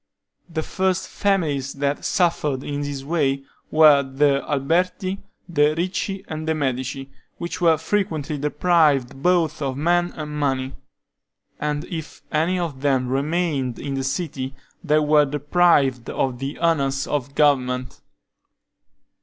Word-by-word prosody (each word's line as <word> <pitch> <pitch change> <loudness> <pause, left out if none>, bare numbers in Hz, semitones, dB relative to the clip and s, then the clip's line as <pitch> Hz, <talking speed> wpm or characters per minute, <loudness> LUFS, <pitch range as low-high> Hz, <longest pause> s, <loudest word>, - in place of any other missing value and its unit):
The 160 -1 -3
first 190 +1 -1
families 150 -9 0
that 140 +1 -2
suffered 150 -7 +1
in 145 0 -3
this 145 -2 -4
way 140 -3 0 0.3
were 155 -2 +6
the 140 +1 +1
Alberti, 180 +7 0 0.3
the 150 -3 +2
Ricci, 185 +2 -2
and 155 0 -5
the 160 - +1
Medici, 135 -1 -3 0.3
which 170 +1 -5
were 165 -2 +5
frequently 160 -4 -2
deprived 150 -4 +2
both 175 -3 +2
of 135 -2 -2
men 175 +3 +2
and 150 -1 -6
money; 135 -2 -1 0.8
and 150 0 -1
if 160 -5 -7
any 165 +4 +1
of 160 -7 -3
them 135 -3 +1
remained 140 -2 -1
in 140 - -4
the 135 0 -2
city, 135 -2 -3 0.3
they 155 -2 +3
were 150 -1 +4
deprived 145 -3 +2
of 130 -2 -1
the 135 +2 -4
honors 140 -5 +1
of 140 -1 -3
government. 125 -4 +1
145 Hz, 130 wpm, -22 LUFS, 135-165 Hz, 0.8 s, were